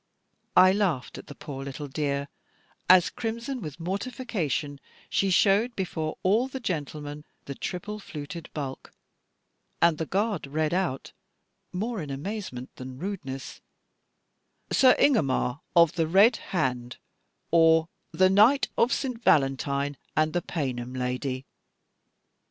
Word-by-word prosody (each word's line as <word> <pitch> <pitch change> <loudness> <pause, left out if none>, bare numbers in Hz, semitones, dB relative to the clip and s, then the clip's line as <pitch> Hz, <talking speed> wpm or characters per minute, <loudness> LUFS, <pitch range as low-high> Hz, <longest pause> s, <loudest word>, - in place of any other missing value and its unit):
I 185 +1 +8
laughed 190 -10 -1
at - - -12
the 145 - -10
poor 135 -2 -7
little 140 +2 -6
dear, 140 0 -2 0.6
as 185 -1 +7
crimson 235 +3 -4
with 155 -3 -7
mortification 185 - -3 0.3
she 195 - +2
showed 205 +5 +3
before 160 -5 -3
all 215 +7 +3
the 265 0 -6
gentlemen 150 - -4 0.2
the 140 - -5
triple 205 +8 -5
fluted 155 -2 -8
bulk, 135 -3 -6 0.9
and 170 -2 +3
the 160 - -2
guard 200 -5 -1
read 155 +3 -1
out, 180 -8 -1 0.6
more 215 +2 -3
in 150 - -6
amazement 140 - -5
than 130 0 -8
rudeness, 145 -7 -6 1.1
"Sir 255 -1 +6
Ingomar 140 - +2 0.2
of 170 -2 +6
the 165 -2 0
Red 200 +8 +5
Hand; 125 -8 -1 0.5
or, 165 -1 +5 0.2
The 185 0 +4
Knight 225 +8 +5
of 235 +2 +4
St. 255 -5 -2
Valentine, 140 0 +2 0.2
and 155 0 +2
the 175 - +1
Paynim 130 -7 -4
Lady." 130 +1 -2
165 Hz, 125 wpm, -27 LUFS, 140-200 Hz, 1.1 s, I